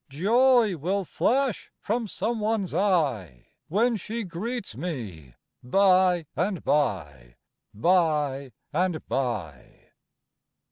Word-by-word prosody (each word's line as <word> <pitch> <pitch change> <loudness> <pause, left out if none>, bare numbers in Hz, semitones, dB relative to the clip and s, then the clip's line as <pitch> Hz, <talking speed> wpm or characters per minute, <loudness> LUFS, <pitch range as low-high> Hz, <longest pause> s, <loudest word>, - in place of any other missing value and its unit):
Joy 225 - +3
will 190 +6 -1
flash 250 +8 0
from 225 +1 -2
some 225 +3 -2
one's 210 -4 -1
eye 140 - 0 0.2
When 225 +6 +1
she 225 +4 -5
greets 205 - -5
me 110 - -6 0.3
by 185 +3 +3
and 185 0 -1
by 75 - -1 0.4
by 150 - +1 0.2
and 175 -1 -1
by." 105 - -4
175 Hz, 95 wpm, -26 LUFS, 130-210 Hz, 0.4 s, Joy